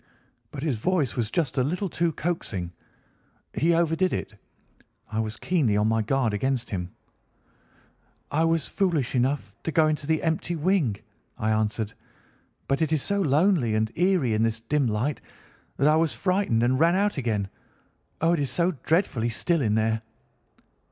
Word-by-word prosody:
"But 140 -1 -7
his 145 -7 0
voice 155 +1 0
was 115 -3 -1
just 145 -4 -1
a - - +3
little 180 +8 -1
too 170 -1 0
coaxing. 110 - -3 0.8
He 165 +2 +2
overdid 170 +2 +2
it. - - -4 0.8
I 110 - -1
was 110 0 -3
keenly 140 - +1
on 105 +1 +2
my 110 0 +2
guard 120 0 0
against 125 +3 -1
him. 90 -3 -3 1.4
"'I 160 +3 +2
was 165 -2 +1
foolish 165 -9 0
enough 130 +3 0
to 165 - -3
go 160 0 +4
into 150 -2 -2
the 160 -1 +1
empty 165 +1 -1
wing,' 160 - +1 0.4
I 110 - 0
answered. 110 0 -1 0.7
'But 135 +2 0
it 160 - +1
is 155 -4 +1
so 200 0 0
lonely 150 - +2
and 110 0 0
eerie 175 - +2
in 110 - +1
this 115 0 +1
dim 140 +3 +1
light 115 +7 -1 0.6
that 140 - +3
I 155 +1 +5
was 160 -1 +1
frightened 185 - +1
and 130 +2 +2
ran 170 +2 +4
out 205 -1 +1
again. 110 -6 -1 0.7
Oh, 165 +1 +3
it 170 - +1
is 140 -2 0
so 170 +7 +1
dreadfully 145 - +1
still 165 +8 0
in 105 -4 +1
there! 110 0 +1
140 Hz, 170 wpm, -26 LUFS, 110-165 Hz, 1.4 s, I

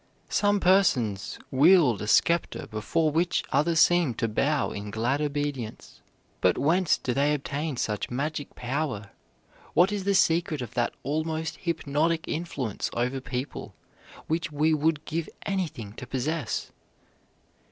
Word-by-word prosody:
Some 205 0 +2
persons 130 - +2
wield 145 - +5
a 105 - -4
scepter 170 +9 +2
before 115 +9 0
which 170 +3 +1
others 165 +2 +2
seem 175 -8 +4
to 115 - 0
bow 140 +7 0
in 100 +1 -6
glad 120 +7 0
obedience. 145 -6 -4 0.4
But 90 -1 +3
whence 170 +3 +3
do 125 - -2
they 145 +3 +2
obtain 145 0 -3
such 105 -3 -2
magic 145 +3 -3
power? 125 -5 -3 0.6
What 180 +5 +5
is 205 -2 -2
the 200 +1 +1
secret 165 -5 +2
of 120 - -9
that 120 -1 0
almost 160 +2 -2
hypnotic 160 -1 -1
influence 145 - -3
over 125 +3 -1
people 130 +2 -5 0.5
which 165 +1 -2
we 155 +2 +2
would 155 0 +1
give 165 0 -3 0.2
anything 160 - -3
to 125 - -7
possess? 135 +1 -2
150 Hz, 135 wpm, -27 LUFS, 125-165 Hz, 0.6 s, wield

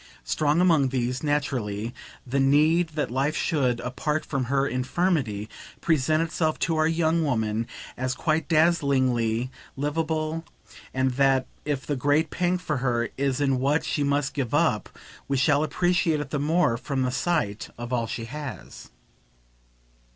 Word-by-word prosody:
Strong 150 +1 +1
among 160 -7 +4
these, 125 0 -1
naturally, 125 -7 -1 0.3
the 135 +2 -1
need 155 +5 +4
that 150 -5 -1
life 140 +4 0
should, 130 -8 +1
apart 150 +5 -2
from 135 -3 -2
her 135 +2 +1
infirmity, 130 - 0 0.3
present 155 0 +2
itself 155 -1 -1
to 165 - 0
our 155 0 +3
young 165 0 +2
woman 115 -5 0 0.3
as 130 0 -2
quite 155 +1 0
dazzlingly 130 -8 +2 0.3
liveable, 155 +2 -1 0.5
and 130 0 +1
that 135 -2 +3 0.2
if 145 -2 -2
the 145 - -1
great 145 +4 +1
pang 180 +1 +1
for 155 -4 -2
her 120 -2 0
is 135 -1 0
in 135 -3 +2
what 145 +4 +1
she 145 - 0
must 140 0 0
give 135 -2 -1
up 145 - +2 0.4
we 140 - 0
shall 140 +3 +3
appreciate 175 -1 +1
it 145 -2 -5
the 145 - -1
more 150 -4 +2
from 135 +1 -2
the 125 - 0
sight 140 -10 -1
of 120 +1 -5
all 115 -2 0
she 115 0 -4
has. 145 0 -8
140 Hz, 150 wpm, -26 LUFS, 125-155 Hz, 0.5 s, among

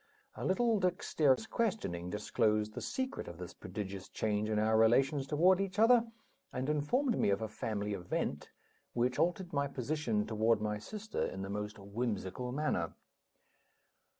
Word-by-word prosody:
A - - -7
little 225 +3 +2
dexterous 180 -3 +2
questioning 205 - -1
disclosed 105 +1 +1
the - - -5
secret 260 +1 -3
of 85 - -8
this 90 -1 -7
prodigious 95 0 -6
change 105 0 -1
in 110 - +1
our 110 +1 +3
relations 135 +5 +4
toward 180 +6 +4
each 195 0 -3
other, 230 +1 +6 0.4
and 130 +1 -3
informed 230 - +1
me - - +3
of 100 0 +2
a - - -1
family 105 -2 -3
event 90 -3 -3 0.4
which 125 +1 +1
altered 175 0 0
my 140 0 +1
position 130 -5 -1
toward 110 0 +2
my 105 0 -2
sister 215 - -5
in 95 - -5
the 95 - -5
most 105 +1 -4
whimsical 105 +2 -3
manner. 150 +4 -1
120 Hz, 150 wpm, -34 LUFS, -, 0.4 s, other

